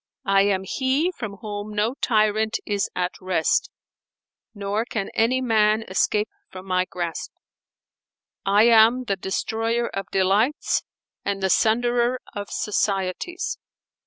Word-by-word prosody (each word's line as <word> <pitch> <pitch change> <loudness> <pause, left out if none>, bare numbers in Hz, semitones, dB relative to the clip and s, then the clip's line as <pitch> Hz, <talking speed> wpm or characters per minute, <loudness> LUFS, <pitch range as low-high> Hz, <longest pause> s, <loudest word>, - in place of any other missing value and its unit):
I 195 0 +4
am 190 -2 +1
he 265 - 0
from 215 - -6
whom 210 -1 -6
no 215 +4 +1
tyrant 220 -3 +1
is 205 -1 -1
at 180 0 0
rest, 185 -3 +1 0.9
nor 200 +2 -1
can 220 -4 -4
any 250 +4 +2
man 220 -2 +3
escape 210 +3 +1 0.2
from 185 0 -10
my 185 -1 +1
grasp: 170 -2 -5 1.1
I 200 +2 +4
am 230 +2 +6
the 200 -5 -1
Destroyer 225 +5 -1
of 195 - -5
delights 200 +9 +2 0.4
and 195 -1 -2
the 190 - +2
Sunderer 240 +2 +2 0.2
of 205 0 -5
societies." 220 - -2
210 Hz, 125 wpm, -23 LUFS, 195-235 Hz, 1.1 s, am